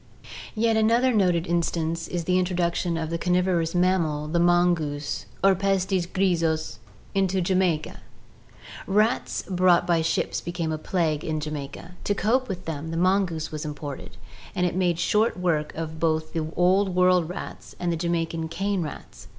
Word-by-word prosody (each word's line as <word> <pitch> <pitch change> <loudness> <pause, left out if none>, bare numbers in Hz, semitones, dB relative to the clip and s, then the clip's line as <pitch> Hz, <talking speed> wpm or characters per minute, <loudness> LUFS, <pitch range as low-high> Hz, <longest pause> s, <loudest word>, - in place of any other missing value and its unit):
Yet 225 0 +2
another 235 +4 +3
noted 180 -5 +2
instance 165 -1 -1
is 175 -1 -3
the 180 +2 +2
introduction 175 -1 0
of 160 -1 -3
the 170 - -2
carnivorous 180 -2 +1
mammal, 170 -5 +1
the 170 +3 0
mongoose 170 -4 +1 0.2
(Herpestes 190 -1 +2
griseus) 165 - 0 0.3
into 190 -1 +1
Jamaica. 180 -3 0 0.9
"Rats 210 +4 +1
brought 180 -2 +3
by 170 -2 +2
ships 165 0 -1
became 170 -2 -3
a 155 - -3
plague 155 -3 -1
in 155 -1 -2
Jamaica. 150 +2 -6
To 205 - 0
cope 250 +6 +1
with 185 -2 -5
them 160 0 -4
the 165 - -3
mongoose 180 -3 +1
was 155 -1 -5
imported, 140 - -7 0.4
and 180 - +1
it 175 - 0
made 180 -2 +1
short 210 +6 +2
work 155 -4 0 0.3
both 155 -1 0
of - - -24
the - - -8
Old 185 +1 +3
World 180 -2 +4
rats 180 - -8
and 175 -1 0
the - - 0
Jamaican 165 -1 -1
cane 195 +3 -1
rats. 155 - -8
175 Hz, 155 wpm, -25 LUFS, 160-185 Hz, 0.9 s, World